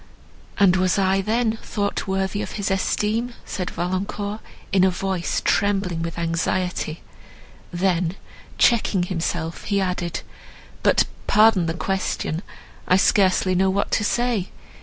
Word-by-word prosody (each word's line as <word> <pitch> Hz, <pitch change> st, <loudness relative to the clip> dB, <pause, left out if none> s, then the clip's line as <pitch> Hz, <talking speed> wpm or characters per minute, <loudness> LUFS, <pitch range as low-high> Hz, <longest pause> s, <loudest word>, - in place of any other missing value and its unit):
"And 190 Hz, -2 st, +5 dB
was 185 Hz, +1 st, +2 dB
I, 195 Hz, 0 st, +2 dB
then, 225 Hz, +2 st, 0 dB
thought 200 Hz, -1 st, -2 dB
worthy 190 Hz, +1 st, -1 dB
of -, -, -5 dB
his 200 Hz, -2 st, -2 dB
esteem?" 215 Hz, +5 st, 0 dB
said 180 Hz, -2 st, -4 dB
Valancourt, 195 Hz, +4 st, -3 dB, 0.3 s
in 190 Hz, -1 st, +4 dB
a 190 Hz, -, +5 dB
voice 185 Hz, -1 st, -2 dB
trembling 195 Hz, -4 st, +1 dB
with 165 Hz, 0 st, -4 dB
anxiety; 170 Hz, 0 st, -1 dB, 0.7 s
then 175 Hz, -1 st, 0 dB, 0.4 s
checking 220 Hz, -6 st, +3 dB
himself, 170 Hz, -2 st, -3 dB
he 200 Hz, -1 st, +1 dB
added, 180 Hz, -3 st, -2 dB, 0.6 s
"But -, -, +4 dB, 0.2 s
pardon 210 Hz, -5 st, +5 dB
the 165 Hz, -, -2 dB
question; 190 Hz, -3 st, -2 dB, 0.5 s
I 185 Hz, -, +5 dB
scarcely 190 Hz, -1 st, +3 dB
know 190 Hz, +1 st, +3 dB
what 200 Hz, +2 st, 0 dB
I -, -, -2 dB
say. 235 Hz, -3 st, 0 dB
190 Hz, 130 wpm, -23 LUFS, 180-200 Hz, 0.7 s, And